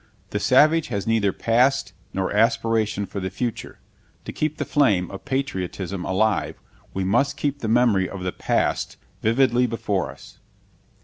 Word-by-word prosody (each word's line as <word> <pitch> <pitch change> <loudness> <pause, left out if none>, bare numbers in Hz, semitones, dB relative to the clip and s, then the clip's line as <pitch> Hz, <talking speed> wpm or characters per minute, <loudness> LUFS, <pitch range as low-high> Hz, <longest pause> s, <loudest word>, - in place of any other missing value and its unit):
The 105 - -1
savage 155 +8 +4
has 100 -5 -3
neither 110 -3 +2
past 125 +7 +1 0.2
nor 95 +1 -2
aspiration 110 -2 +1
for 100 - -6
the 95 0 -3
future. 115 +5 -4 0.5
To - - -5
keep 155 0 -2
the - - -2
flame 105 - +2
of 100 - -9
patriotism 95 -8 -3
alive, 100 0 0 0.3
we 95 - -2
must 140 +9 +1
keep 145 -2 -2
the 115 - -3
memory 110 -5 +3
of 95 -2 -7
the 90 - -1
past - - -1 0.2
vividly 125 +2 +3
before 105 -5 -2
us. - - -13
110 Hz, 150 wpm, -23 LUFS, 95-130 Hz, 0.5 s, savage